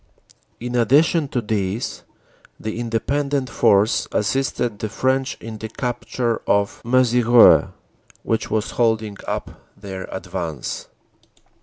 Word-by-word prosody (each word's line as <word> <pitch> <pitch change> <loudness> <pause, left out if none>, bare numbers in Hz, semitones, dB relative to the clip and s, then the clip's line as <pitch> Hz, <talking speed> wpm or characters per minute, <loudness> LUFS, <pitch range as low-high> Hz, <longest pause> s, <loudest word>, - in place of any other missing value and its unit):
In 120 +1 -5
addition 145 +6 +3
to 125 -2 -2
these, 105 +1 -2 0.6
the 110 +1 -4
Independent 135 +3 -1
Force 100 +1 +3
assisted 120 -1 -1
the 110 - -3
French 130 +4 0
in 110 -1 -8
the 110 - -6
capture 120 0 -2
of 100 0 +1
Mezieres, 120 -1 +5 0.6
which 115 0 -1
was 110 +1 -1
holding 110 -3 0
up - - -3 0.3
their 95 -2 -7
advance. 85 -8 -5
115 Hz, 110 wpm, -21 LUFS, 105-125 Hz, 0.6 s, Mezieres